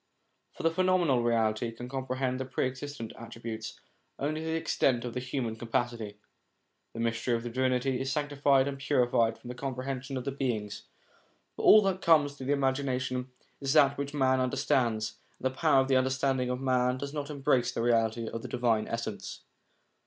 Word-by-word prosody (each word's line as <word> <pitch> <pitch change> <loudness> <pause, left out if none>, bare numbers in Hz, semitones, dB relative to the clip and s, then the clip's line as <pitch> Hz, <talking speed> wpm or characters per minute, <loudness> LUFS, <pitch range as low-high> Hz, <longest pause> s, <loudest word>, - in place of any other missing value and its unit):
For - - -9
the 165 - +3
phenomenal 175 -7 +2
reality 115 -1 +1
can 120 +2 -8
comprehend 130 -1 -2
the 130 - -2
Pre 130 0 -1
existent 130 -2 -5
attributes 115 -1 -7 0.4
only 155 +3 -2
to 160 - -5
the 160 - 0
extent 130 -6 +1
of 120 - -4
the 125 - -2
human 125 -3 -3
capacity. 115 -2 -2 0.8
The - - -5
mystery 115 +1 0
of 115 - -3
Divinity 130 +1 0
is 135 0 -2
sanctified 140 -2 +2
and 140 -1 -4
purified 120 -5 +2
from 120 - -11
the - - -4
comprehension 135 +1 -4
of 125 - -4
the 140 - -1
beings, 110 -6 -3 0.7
for - - -6
all 215 0 +8
that 190 -1 0
comes 150 -4 +4
to 130 - -8
the 135 - -1
imagination 130 -2 0 0.3
is 135 -1 0
that 140 -3 +5
which 140 0 -3
man 130 -2 +3
understands, 120 -3 0 0.2
and - - -10
the 130 0 0
power 145 -3 +4
of 130 - -1
the 135 -1 +4
understanding 130 0 +1
of 125 0 -2
man 125 -1 +1
does 140 +2 -5
not 145 -1 -4
embrace 135 -4 +1
the 115 - -2
Reality 115 -1 +1
of 115 - -5
the - - -6
Divine 115 -3 +1
Essence. 110 -4 -5
130 Hz, 180 wpm, -29 LUFS, 120-140 Hz, 0.8 s, all